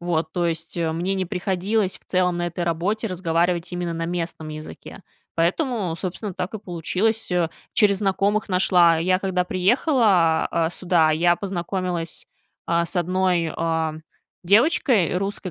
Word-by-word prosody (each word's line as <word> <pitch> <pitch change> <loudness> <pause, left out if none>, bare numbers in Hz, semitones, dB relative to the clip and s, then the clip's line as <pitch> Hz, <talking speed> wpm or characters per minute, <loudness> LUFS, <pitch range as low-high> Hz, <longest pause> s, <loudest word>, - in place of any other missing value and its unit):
Вот, 165 -2 -1
то 175 -1 0
есть, 165 0 -4
э, 165 -2 0
мне 175 +4 -1
не 190 -1 -2
приходилось 190 +2 -1
в - - -30
целом 180 -1 +1
на 175 - -1
этой 175 0 -3
работе 185 +7 -1
разговаривать 175 -1 0
именно 175 -1 -2
на 165 0 -3
местном 165 -2 -4
языке. 155 0 -9 0.3
Поэтому, 185 - 0
собственно, 190 +3 -5
так 180 +4 -4
и - - -3
получилось, 195 +4 -2
э. 175 -2 +1 0.2
Через 200 -2 +3
знакомых 205 +1 0
нашла. 180 -3 +4
Я, 185 +3 +2
когда 185 -2 0
приехала, 185 - +3
а, 165 -1 +1
сюда, 175 -3 +2
я 175 +2 +3
познакомилась, 180 -3 -3 0.4
а, 170 0 +2
с 175 - -5
одной, 180 -2 +1
а, 160 -1 -1 0.5
девочкой 215 - +3
русской, 195 0 -3
180 Hz, 150 wpm, -23 LUFS, 170-195 Hz, 0.5 s, нашла